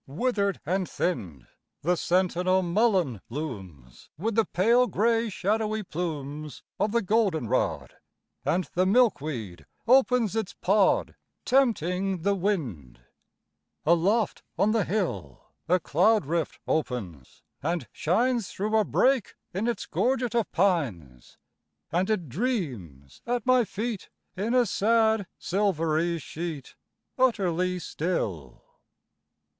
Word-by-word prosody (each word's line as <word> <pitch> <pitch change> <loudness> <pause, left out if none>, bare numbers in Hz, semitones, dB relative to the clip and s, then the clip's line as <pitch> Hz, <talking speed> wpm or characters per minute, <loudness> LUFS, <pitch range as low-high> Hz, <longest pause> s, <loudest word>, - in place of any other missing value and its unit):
Withered 200 - 0
and 185 +3 -1
thinned, 90 - -3 0.4
The 175 +4 +2
sentinel 185 +1 +1
mullein 175 - +1
looms, 95 - -8
With 220 +8 -1
the 225 0 +3
pale 235 +7 +3
gray 230 +2 +1
shadowy 215 +2 -1
plumes 150 -4 -5 0.2
Of 205 - +1
the 235 0 +1
goldenrod; 190 - 0 0.5
And 180 +3 +1
the 185 +1 +2
milkweed 155 - +1 0.2
opens 250 -4 +4
its 220 -4 -2
pod, 195 +1 +2 0.3
Tempting 195 - +1
the 200 +1 +3
wind. 135 - -3 0.8
Aloft 185 +8 +2 0.2
on 210 - +3
the 220 -4 +1
hill, 105 - -3 0.2
A 180 +1 +4
cloudrift 170 -2 +1
opens 100 - -3 0.2
and 170 +3 -2
shines 230 +5 +1
Through 215 +3 -2
a 220 - +4
break 260 +1 +1 0.2
in 200 +6 -1
its 235 -4 -2
gorget 245 -2 0
of 235 -3 0
pines, 115 - -1 0.5
And 180 +4 +1
it 185 -7 0
dreams 125 - -4
at 240 -2 -1
my 255 -2 +4
feet 215 0 -4 0.3
In 220 +6 -1
a 250 -1 +5
sad, 220 -1 +2
silvery 170 -4 0
sheet, 160 -2 -6 0.5
Utterly 185 -7 +1
still. 110 - -3
185 Hz, 110 wpm, -27 LUFS, 155-220 Hz, 0.8 s, a